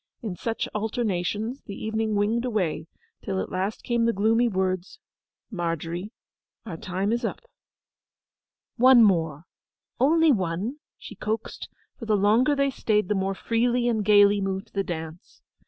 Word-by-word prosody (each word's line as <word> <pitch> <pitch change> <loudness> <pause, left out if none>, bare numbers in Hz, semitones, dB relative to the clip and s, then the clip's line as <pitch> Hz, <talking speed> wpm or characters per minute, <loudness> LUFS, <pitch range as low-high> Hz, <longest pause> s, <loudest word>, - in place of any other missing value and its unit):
In 205 -6 -4
such 225 +5 -3
alternations 215 +2 -2
the 200 - -6
evening 220 0 -2
winged 215 +4 +1
away; 180 -10 -1 0.3
till 190 -2 -3
at - - -4
last 190 +3 -3
came 235 -1 +1
the 230 - +3
gloomy 225 +4 +2
words, 185 -3 -2 0.5
'Margery, 170 +1 -3 0.5
our 185 - -6
time 190 +5 -2
is 235 +2 -1
up.' 230 - -4 1.3
'One 250 -1 +7
more—only 205 - +1
one!' 195 - -1 0.2
she - - -10
coaxed, 220 +1 -4 0.3
for 230 - -7
the 215 -1 +3
longer 225 +8 +3
they 275 0 +1
stayed 210 -6 0
the - - +3
more 195 0 -1
freely 240 +3 0
and 220 -3 +1
gaily 205 0 +5
moved 195 +2 -4
the 195 - 0
dance. 160 -1 -8
210 Hz, 140 wpm, -25 LUFS, 185-230 Hz, 1.3 s, One